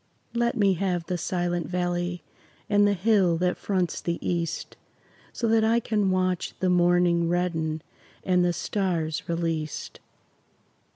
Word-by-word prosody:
Let 235 0 0
me 200 -3 +4
have 180 -2 -1
the 180 - -2
Silent 175 -1 -1
Valley 175 -1 -2 0.4
And 205 0 +4
the 205 - +2
hill 190 -3 +3
that 180 +1 +1
fronts 185 -4 -1
the 170 -1 -2
east, 170 -2 -3 0.6
So 235 - -2
that 225 0 +4
I 225 +2 +3
can 210 -4 0
watch 185 -1 0
the 185 -1 +2
morning 175 -1 +3
Redden 165 -3 -1 0.4
and 180 -1 +3
the 175 - +2
stars 170 -4 -2
released. 165 -2 -3
180 Hz, 135 wpm, -26 LUFS, 170-195 Hz, 0.6 s, me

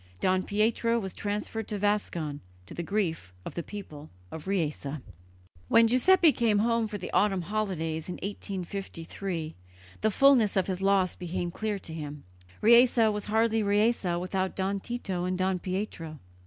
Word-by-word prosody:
Don 185 0 +2
Pietro 225 +4 +1
was 195 -5 -4
transferred 210 +1 -3
to 210 - -3
Vascon, 185 -8 -1 0.3
to - - -11
the - - -4
grief 165 - -2
of - - -6
the 170 - -3
people 155 -6 -9 0.2
of 160 +2 -8
Riese. 165 -7 -1 0.8
When 230 - +6
Giuseppe 320 +8 +5
came 230 -6 +2
home 230 +1 +2
for 210 -1 -5
the 180 - -7
autumn 195 -3 +2
holidays 170 -5 -2
in 180 - -3
1853 190 -3 -5 0.5
the 220 - +3
fullness 240 -3 +4
of 190 - +3
his 190 -1 -3
loss 195 -2 +2
became 175 0 -3
clear 215 +2 -2
to 165 -4 -8
him; 150 -2 -7 0.4
Riese 235 +3 +6
was 215 -2 +2
hardly 225 +1 +2
Riese 205 -3 +2
without 185 +1 -2
Don 195 +1 -1
Tito 195 -5 -4
and 185 0 -1
Don 185 0 0
Pietro. 180 -4 -4
195 Hz, 155 wpm, -28 LUFS, 175-215 Hz, 0.8 s, When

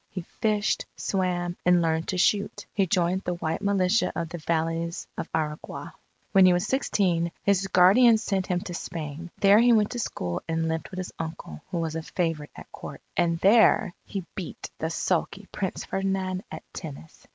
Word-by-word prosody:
He 185 -2 -6 0.2
fished, 215 -1 +1
swam, 180 -2 -1
and 180 0 +5
learned 160 0 0
to 185 - -1
shoot. 205 +2 +1
He 195 -2 +2
joined 180 +1 +1
the 180 - -2
White 160 -2 -2
Militia 200 +1 +2
of 165 -1 -2
the 175 0 -6
Valleys 165 +2 -1
of - - -5
Aragua. 150 -1 -4 0.4
When 190 -2 +7
he 180 - +6
was 175 +2 +1
sixteen, 185 -9 +1
his 195 -1 +2
guardian 205 +6 +6
sent 195 -3 -1
him 180 -1 0
to 180 - -6
Spain. 165 -1 -6
There 200 +1 +7
he 240 +1 +6
went 210 -2 +3
to 245 - -3
school 90 - -3
and 165 0 0
lived 160 -2 -2
with 185 - -9
his 185 -1 -5
uncle, 160 - -6
who 175 - -3
was 165 -1 -2
a 165 - -2
favourite 165 -3 -2
at - - -12
Court. - - -8 0.2
And 170 -1 +2
there, 205 -3 +5
he 195 -4 -5
beat 185 -4 -7
the 160 - -1
sulky 190 +4 -1
Prince 190 -3 -3
Ferdinand 190 -1 -2
at - - -7
tennis. 160 -1 -9
180 Hz, 185 wpm, -26 LUFS, 165-195 Hz, 0.4 s, When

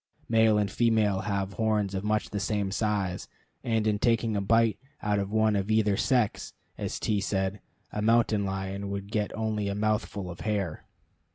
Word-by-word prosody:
Male 110 -1 +4
and 105 -2 0
female 110 -4 +2
have 100 0 -2
horns 105 -3 0
of 95 0 -2
much 105 0 0
the 105 - -2
same 100 -1 -1
size; 100 -4 -1 0.4
and 115 -2 +1
in 105 -1 +1
taking 115 -1 +2
a 100 - 0
bite 115 +1 +3 0.2
out 105 -1 +1
of 100 0 -3
one 110 -1 +3
of 100 +1 -1
either 110 -2 +3
sex, 120 -1 0 0.2
as - - -4
T 105 -2 0
said, 95 0 -1 0.3
a 105 - -3
mountain 110 -1 +3
lion 95 +1 -3
would 100 +1 -5
get 105 -2 -1
only 110 -2 -1
a 100 - -2
mouthful 105 -3 -1
of 85 - -10
hair. 100 -7 -2
105 Hz, 180 wpm, -28 LUFS, 100-110 Hz, 0.4 s, Male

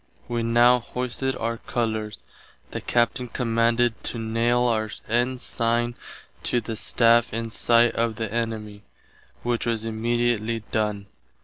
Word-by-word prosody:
Wee 120 -1 -1
now 120 +2 +5
hoisted 125 +2 -2
our 115 0 -2
colours. 110 -3 -2 0.5
The - - -4
Captain 120 +1 +1
commanded 115 0 +1
to - - -3
naile 115 +2 +1
our 110 -2 0 0.2
Ensigne 120 0 0 0.5
to 120 - +1
the 115 0 -5
staff 115 +1 +3
in 115 0 -3
sight 120 +1 +4
of 115 -1 0
the 110 +1 -3
enimie, 110 -2 -3 0.6
which 120 -1 -1
was 115 -1 -1
immediately 115 0 0
done. 105 -2 -1
115 Hz, 125 wpm, -25 LUFS, 110-120 Hz, 0.6 s, now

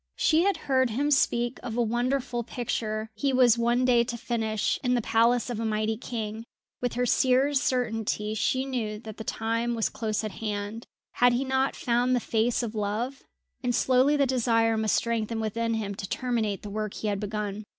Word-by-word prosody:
She 320 -1 +3
had 390 -1 +2
heard 260 -2 +2
him 280 +6 0
speak 240 -3 +2
of 230 0 -5
a - - +3
wonderful 240 +2 -1
picture 220 -2 -3
he 275 +3 0
was 245 -3 +5
one 240 +2 +2
day 240 -2 +4
to 240 0 -4
finish 220 -3 -1
in 250 -1 +2
the - - +2
palace 230 +2 +3
of 230 - -3
a - - -2
mighty 215 0 0
king. 220 -1 -5 0.4
With 245 -1 -1
her 245 +1 0
seer's 265 +3 +3
certainty 225 -6 -1
she 260 +4 0
knew 230 -6 -3
that 220 -1 -10
the 220 - -6
time 230 +2 -1
was 225 - 0
close 220 -1 -2
at 215 - -3
hand 210 +1 -5 0.2
had 245 0 +4
he 255 +3 0
not 265 +1 +1
found 245 +1 +1
the - - +2
face 235 +2 0
of 225 -2 -4
love, 220 +5 -2 0.4
and 245 -2 0
slowly 260 +4 +3
the 280 - +3
desire 230 -3 +2
must 220 -1 +1
strengthen 230 -1 -1
within 230 +1 -1
him 205 -2 -3
to 195 -1 -6
terminate 230 -6 -1
the 205 - -7
work 215 0 -3
he 215 - -4
had 200 -1 -1
begun. 210 0 -4
235 Hz, 195 wpm, -27 LUFS, 220-250 Hz, 0.4 s, was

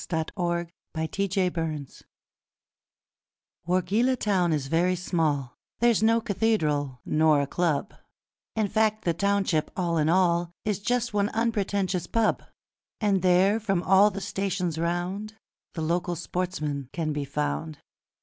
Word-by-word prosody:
The 160 -2 0
Wargeilah 170 -2 -1 0.2
Handicap 165 - -2 1.6
Wargeilah 200 +9 +2
town 185 -5 +2
is 150 -3 0
very 170 +5 +2
small, 155 -7 -1 0.3
There's 235 -2 +3
no 225 +1 +4
cathedral 160 - 0
nor 155 -1 +3
a 140 - +1
club, 170 +4 -1 0.6
In 215 -2 +1
fact 215 +1 +1
the 170 - +2
township, 195 -4 +1
all 170 -3 0
in 150 +1 +2
all, 175 -1 +3 0.2
Is 210 -2 0
just 240 +2 -1
one 205 0 +1
unpretentious 200 -5 0
pub; 225 -1 +1 0.6
And 200 -4 +2
there, 185 +4 +4
from 195 -5 0
all 195 +5 +6
the 195 -1 -6
stations 185 -5 -2
round, 180 +6 -2 0.4
The 160 - -2
local 175 +2 0
sportsmen 155 -6 -3
can 160 -3 -2
be 145 -1 -2
found. 75 - -3
180 Hz, 130 wpm, -26 LUFS, 160-200 Hz, 1.6 s, all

